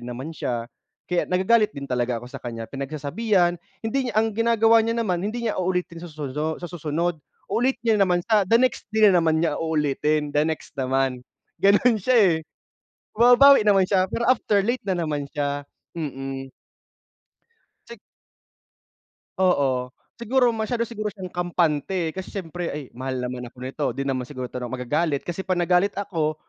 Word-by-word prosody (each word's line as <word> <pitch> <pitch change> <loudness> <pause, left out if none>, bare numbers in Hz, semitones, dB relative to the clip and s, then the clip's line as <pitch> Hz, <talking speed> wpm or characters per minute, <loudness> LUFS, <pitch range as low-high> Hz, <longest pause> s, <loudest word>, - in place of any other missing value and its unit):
rin 120 - -9
naman 130 +6 -6
siya. 120 -6 -3 0.4
Kaya 180 -1 -1
nagagalit 200 +2 +2
din 140 - -5
talaga 125 -2 -1
ako - - -8
sa - - -7
kaniya, 115 -2 -6
pinagsasabihan, 175 +7 0 0.3
hindi 255 +3 -1
niya - - -5
ang 220 0 +2
ginagawa 230 0 +4
niya 230 +1 -1
naman 185 -7 0
hindi 225 +5 -3
niya 215 -4 -1
uulitin 180 -2 -2
sasuno 155 -1 -4
sa - - -9
susunod, 165 0 -2 0.3
uulit 255 +3 +2
niya 220 -3 +3
na 195 - +4
naman 175 -1 +1
sa 210 -4 +2
the 230 - +6
next 255 -2 0
day 215 -2 +6
na 180 - +4
naman 160 0 +2
niya - - -1
uulitin, 150 -1 0
the 145 - +2
next 160 +1 -2
naman. 130 -1 0 0.4
Gano'n 210 +4 +4
siya, 255 +6 +2
eh, 195 -7 +5 0.8
bumababawi 245 +4 +7
naman 195 -2 +5
siya 190 -1 +2
pero 235 - -2
after 215 -5 +2
late 240 +3 0
na 190 - +1
naman 145 -3 -3
siya, 145 -1 -1 0.4
mm. 135 -3 -5 1.4
Sik 235 -2 -10 1.4
Oo, 135 -9 +1 0.3
siguro 245 +1 +2
masyado 225 +1 -2
siguro 215 -3 -4
siyang 185 -2 -8
kampante, 175 -1 0
kasi 185 +3 -8
siyempre 175 -2 -4
ay 150 - -5
mahal 130 +1 -4
naman 125 0 -4
ako 120 - -15
nito, 135 +3 -3
'di 140 - -3
naman 130 -2 -2
siguro 130 -2 -6
'to - - -5
'no, 125 0 -6
magagalit 140 +4 -1
kasi 185 +2 -5
pag 185 -2 0
nagalit 180 +3 +2
ako 165 -6 -1
175 Hz, 170 wpm, -24 LUFS, 140-210 Hz, 1.4 s, bumababawi